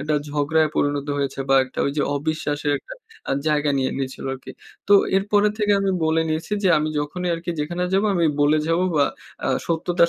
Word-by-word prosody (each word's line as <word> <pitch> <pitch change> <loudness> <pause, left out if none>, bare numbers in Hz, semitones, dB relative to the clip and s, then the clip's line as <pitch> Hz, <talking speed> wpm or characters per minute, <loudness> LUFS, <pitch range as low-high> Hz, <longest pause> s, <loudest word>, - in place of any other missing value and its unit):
একটা 150 +2 -1
ঝগড়ায় 150 +2 +1
পরিণত 145 0 0
হয়েছে 135 -1 -2
বা - - +6
একটা 130 - -11
ওইযে 145 +1 0
অবিশ্বাসের 150 -1 -1
একটা - - -11 0.4
আ - - +2 0.2
জায়গা 150 -1 +2
নিয়ে 130 - 0
নিয়েছিল 130 -1 -5
আরকি। 130 0 -11 0.4
তো 205 - +5 0.2
এরপরে 205 +1 +3
থেকে 210 -1 +2
আমি 195 -1 +1
বলে 160 +1 +2
নিয়েছি 155 +6 -3
যে - - +5
আমি 155 - -1
যখনই 180 +5 -3
আরকি 170 +1 -5
যেখানে 175 +4 -2
যাবো 200 +2 +3
আমি 170 -2 +2
বলে 145 +2 +4
যাবো 170 +3 +2
বা 145 - +5 0.4
আ - - 0 0.2
সত্যতার 170 +1 +2
155 Hz, 190 wpm, -22 LUFS, 145-175 Hz, 0.4 s, বা